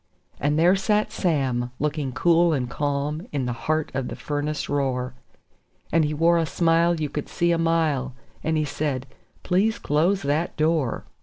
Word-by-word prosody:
And 145 +1 +1
there 175 +4 +5
sat 210 +2 +1
Sam, 130 -8 0
looking 150 -2 -2
cool 170 +5 +3
and 130 -4 -1
calm, 145 - -2
in 140 -3 -1
the 125 - -1
heart 155 +6 -1
of 130 -1 -2
the - - -5
furnace 150 +1 -3
roar; 130 -3 -1 0.8
And 165 -1 +4
he 150 - 0
wore 170 +2 +4
a 165 - +1
smile 170 +1 +2
you 155 - 0
could 150 0 -5
see 175 0 +1
a 170 - +1
mile, 155 -6 +1 0.3
and 160 0 +1
he 155 - +1
said: 140 -2 -2 0.4
"Please 210 +5 +2
close 170 +7 +1
that 150 +4 -1
door. 155 -5 0
150 Hz, 170 wpm, -24 LUFS, 140-165 Hz, 0.8 s, there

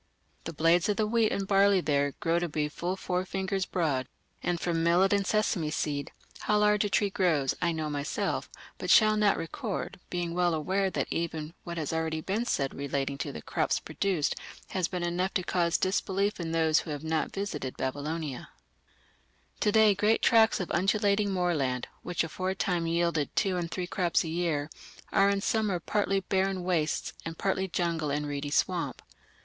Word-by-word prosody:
The 165 - -4
blades 165 +4 +3
of 205 - +1
the 215 - +2
wheat 220 0 +2
and 195 -1 -2
barley 200 0 +5
there 145 -4 +1
grow 165 +1 0
to 175 -1 -2
be 150 0 -1
full 175 +4 -3
four 180 -1 -2
fingers 190 0 -2
broad; 140 -8 0 0.3
and 175 -1 -1
from 165 -1 0
millet 180 +4 +4
and 200 -2 +1
sesame 210 -7 +1
seed, 145 -2 -2 0.3
how 210 - +1
large 210 0 +3
a 205 - -1
tree 200 0 +2
grows, 160 -9 +2
I 175 -1 +2
know 160 -1 -2
myself, 145 -1 -2 0.3
but - - -4
shall 215 -1 +6
not 210 -2 +3
record, 190 +5 -4
being 175 -1 -2
well 175 -1 +2
aware 190 +5 0
that - - -2
even 160 -1 -3
what 170 -1 -6
has 155 -1 -2
already 160 -1 -1
been 200 +8 -2
said 135 - 0
relating 140 0 -3
to - - -3
the 75 - -8
crops - - 0
produced 180 -7 -1 0.4
has 185 -3 0
been 180 -2 -4
enough 180 +3 -1
to 185 - +1
cause 175 -2 +1
disbelief 195 +1 0
in 165 -2 -3
those 160 -1 +3
who - - -7
have 145 0 -4
not 160 0 -1
visited 155 -10 -4
Babylonia." 145 +1 -3 1.1
To 210 - +2
day 220 -1 +6
great 210 +3 +2
tracts 225 -2 +5
of 180 - -3
undulating 200 +2 +2
moorland, 160 -10 0
which 180 -1 -1
aforetime 180 0 -1
yielded 170 -3 0
two 190 -2 +1
and 175 -2 -2
three 180 +1 -3
crops 175 -1 +1
a 165 - -4
year, 160 -3 -1 0.4
are 195 0 +4
in 200 0 +1
summer 210 -5 +1
partly 195 +2 0
barren 190 -1 0
wastes 170 -4 0
and 165 0 -6
partly 190 -1 0
jungle 170 -4 -1
and 145 +1 -1
reedy 145 0 -3
swamp. 145 - 0
175 Hz, 180 wpm, -29 LUFS, 160-195 Hz, 1.1 s, shall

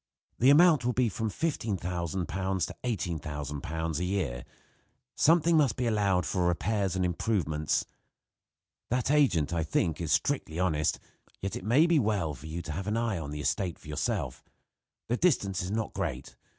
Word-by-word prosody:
The 125 - +5
amount 155 -1 +6
will 125 +1 +1
be 125 -1 +2
from 110 +2 -2
£15,000 115 -7 -2
to 90 +1 -2
£18,000 80 - -3
a - - -1
year. 90 -11 -2 0.7
Something 165 +1 +4
must 140 -8 +3
be 125 - -1
allowed 100 -6 +2
for 90 +2 0
repairs 95 +1 0
and 95 -1 +1
improvements. 85 -5 0 1.0
That 125 +2 +1
agent, 120 - +3
I 85 - +1
think, 80 +1 0
is 80 -2 -2
strictly 80 - 0
honest; 75 -5 +1 0.4
yet 95 - -3
it - - -6
may 125 - +4
be 170 -3 +4
well 100 - 0
for 70 +3 -10
you 85 +2 -5
to 80 - -6
have 95 +6 -4
an 105 +2 0
eye 115 -6 0
on 75 -3 -6
the 75 0 -5
estate 90 +3 -1
for - - -16
yourself. 75 0 -2 0.6
The 120 - 0
distance 100 - +1
is 90 - -4
not 110 +1 -2
great. - - -4
95 Hz, 165 wpm, -29 LUFS, 80-115 Hz, 1.0 s, amount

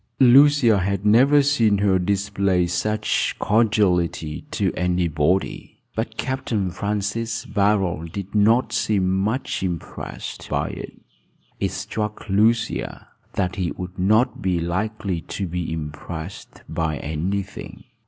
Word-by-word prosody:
Lucia 130 -3 +6
had 100 +2 -1
never 135 +7 +5
seen 115 -8 +3
her 95 -2 +2
display 100 -1 +1
such 105 +5 0
cordiality 95 -8 +1
to - - 0
anybody. 90 -1 0 0.2
But - - -3
Capt. 130 0 -3 0.2
Francis 105 +4 -2
Barold 95 -5 0
did 100 +1 -6
not 110 +4 +3
seem 95 -3 +1
much 110 +7 -1
impressed 90 -4 -5
by - - -1
it. - - -8 0.6
It 100 - 0
struck 105 +2 -4
Lucia 110 +3 +1 0.2
that 90 0 -1
he 90 -3 -1
would 90 +1 -8
not 110 +7 +2
be 90 -2 0
likely 95 +1 -2 0.2
to 100 - -1
be 85 -1 -3
impressed 80 +3 -7
by 80 -2 -2
any 85 +8 -2
thing. 95 - -11
100 Hz, 120 wpm, -22 LUFS, 90-110 Hz, 0.6 s, Lucia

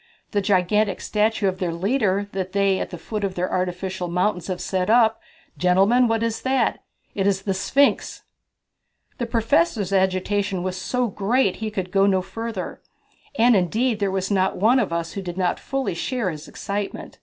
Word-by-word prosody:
The 205 - +1
gigantic 200 +1 +2
statue 215 -1 +1
of 185 -1 -2
their 180 -2 -1
leader 200 +2 0
that 190 -1 -4
they 195 -1 +2
at - - -3
the 175 - -7
foot 210 +4 -5
of 190 -2 -2
their 180 +1 -2
artificial 185 0 -2
mountains 180 0 0
have 185 -2 -3
set 185 0 -1
up 225 -1 +4 0.4
gentlemen, 195 +8 +4
what 225 0 0
is 230 -1 -2
that? 260 -2 +1 0.3
It 195 -1 0
is 195 -1 +1
the 195 - 0
Sphinx!" 275 +9 +1 1.0
The 240 - -2
Professor's 230 - +1
agitation 190 0 +1
was 185 0 -2
so 250 +7 -1
great 205 +2 +1
that - - -14
he 220 0 -2
could 190 -3 -4
go 195 0 +4
no 190 -2 +2
further. 225 0 -5 0.6
And 235 +1 +5
indeed 215 +5 +1
there 200 -1 +1
was 190 +1 -2
not 190 -1 +1
one 230 +7 +4
of 210 -8 -1
us 170 0 -2
who 200 - -4
did 180 -1 -6
not 180 -2 0
fully 270 -7 -2
share 230 +2 -2
his 155 -1 -9
excitement. 200 0 -5
195 Hz, 185 wpm, -23 LUFS, 185-225 Hz, 1.0 s, And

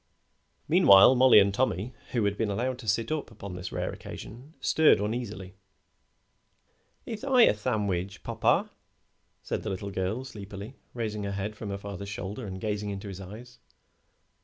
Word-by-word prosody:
Meanwhile 100 +5 +8
Mollie 130 -1 +6
and 100 -1 +5
Tommy, 110 0 -1 0.2
who 115 -4 +1
had 100 0 +1
been 110 0 -1
allowed 125 +5 -2
to 115 - -10
sit 110 +6 0
up 155 -2 -2
upon 100 -4 -9
this 90 0 -6
rare - - -2
occasion, 130 +9 -10
stirred 160 -9 +4
uneasily. 105 -3 -4 1.5
"Ith 225 0 -6
I 260 -3 +5
a - - +6
thandwich, 100 -4 -2
popper?" - - +1 0.7
said - - -3
the 110 - -4
little 100 +1 -4
girl, 95 +7 -2
sleepily, 100 -1 -8 0.2
raising 110 -3 -3
her 100 - -3
head 100 +2 -4
from 105 -1 -7
her 100 - -3
father's 100 0 -7
shoulder 100 +3 -5
and 95 -1 -6
gazing 105 0 -2
into 100 0 -5
his 95 0 -7
eyes. 110 +6 -11
105 Hz, 160 wpm, -28 LUFS, 100-120 Hz, 1.5 s, Meanwhile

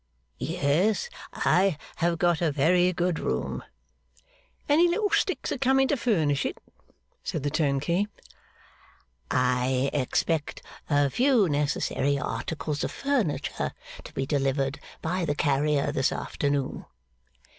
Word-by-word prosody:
'Yes, 185 - +1 0.2
I 185 -3 +2 0.2
have 170 0 +1
got 175 0 +2
a 165 -3 +2
very 175 +6 +3
good 175 -1 0
room.' - - -2 1.0
'Any 315 +4 +5
little 410 +4 0
sticks 375 - 0
a - - -2
coming 270 0 +3
to - - +3
furnish 160 - +1
it?' - - -3 0.7
said 155 - -3
the 145 - -1
turnkey. 155 +5 +1 1.2
'I 125 +1 +1
expect 145 +3 -1 0.3
a 145 -2 +3
few 250 - +3
necessary 145 -1 0
articles 150 +1 -3
of - - -1
furniture 275 - -1 0.3
to - - -11
be 135 - -1
delivered 135 0 0 0.2
by 180 +3 -1
the 145 -3 0
carrier, 145 0 +1
this 135 -3 +1
afternoon. 140 -2 -2
155 Hz, 120 wpm, -27 LUFS, 140-185 Hz, 1.2 s, Any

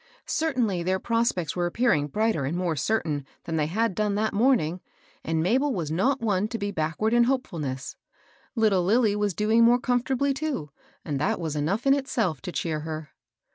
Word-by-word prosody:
Certainly 250 - 0
their 185 +2 0
prospects 230 -6 0
were 175 -1 0
appearing 175 - +1
brighter 215 -1 0
and 145 +6 -2
more 175 -3 -1
certain 150 -2 -1 0.2
than 165 - -4
they 150 -1 +1
had 220 +5 0
done 210 +1 0
that 215 +1 0
morn 245 +4 +4
ing, 165 +4 -4 0.4
and 160 0 0
Mabel 260 - +2
was 160 -5 -3
not 250 - +1
one 205 -3 +1
to 230 - -4
be 205 -1 -3
backward 175 +6 -1
in 240 0 +5
hopeftilness. 155 - -3 0.6
Little 215 -6 +3
Lilly 215 +2 +3
was 205 -3 -1
doing 220 +2 +3
more 240 +1 +6
com 245 -1 +1
fortably 270 +2 0
too, 270 - -3 0.3
and 145 -3 -2
that 205 +8 0
was 160 -3 -3
enough 175 - -1
in 275 - +6
itself 235 - -1
to 185 - -5
cheer 160 -3 -2
her. 155 0 -6
205 Hz, 190 wpm, -26 LUFS, 160-235 Hz, 0.6 s, more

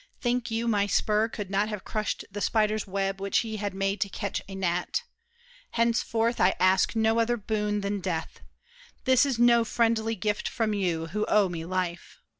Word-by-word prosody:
Think 245 0 -1
you 230 +1 -1
My 205 -3 +2
spur 215 +2 +2
could 205 -4 -6
not 205 +2 +1
have 210 -3 -5
crushed 215 -1 -3
the 205 +1 -5
spider's 215 -1 +1
web 195 0 -2
Which 200 0 +1
he 220 -1 -4
had 205 -2 -3
made 195 +1 -1
to 200 - +1
catch 200 +1 -3
a 195 - -6
gnat? 180 - -1 0.7
Henceforth 230 0 +1
I 185 +1 +4
ask 190 +4 +3
no 225 +1 +2
other 240 +1 +2
boon 210 -1 -1
than 200 0 -2
death. 175 -4 -4 0.6
This 260 +2 +4
is 265 -4 -1
No 235 0 +5
friendly 225 -1 +1
gift 210 +1 -1
from 220 -3 -1
you, 175 -5 -1
who 210 +4 -1
owe 205 -3 +4
me 165 -2 -5
life! 180 -1 -3
210 Hz, 185 wpm, -27 LUFS, 195-225 Hz, 0.7 s, No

